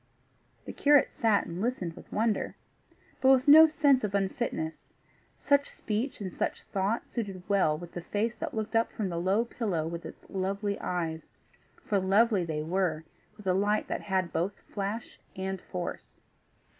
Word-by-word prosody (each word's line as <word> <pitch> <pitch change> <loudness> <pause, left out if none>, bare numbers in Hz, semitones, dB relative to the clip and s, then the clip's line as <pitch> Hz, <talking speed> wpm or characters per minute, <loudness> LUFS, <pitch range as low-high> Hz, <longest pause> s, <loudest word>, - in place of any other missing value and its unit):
The - - -6
curate 290 -1 +4
sat 220 -4 +2
and 170 +2 -5
listened 210 -8 -2
with - - -14
wonder 220 0 0 0.7
but 265 - +5
with 265 +1 +5
no 315 +2 +10
sense 285 -5 +3
of 200 -1 -1
unfitness; 190 -5 -2 0.5
such 285 -1 +2
speech 225 +6 -3
and 190 -3 -5
such - - -2
thought 200 +3 -1
suited 195 -6 -5
well 190 -7 +3
with 175 +1 -9
the 175 - -6
face 215 +6 -1
that - - -4
looked 220 +1 -3
up 225 0 +2
from 205 -4 -3
the 170 -1 -2
low 195 +6 +2
pillow 200 -10 -2
with 170 0 -5
its - - -11
lovely 200 +2 -2
eyes 165 -3 -3 0.6
for 200 - +1
lovely 200 +1 +3
they 155 -2 -3
were, 165 -2 0 0.3
with 210 - -13
a 185 - +3
light 205 +3 +1
that - - -2
had 185 -3 -1
both 180 +5 -2
flash 205 +3 -5 0.2
and 190 0 -4
force. 180 -1 -6
200 Hz, 170 wpm, -29 LUFS, 180-225 Hz, 0.7 s, no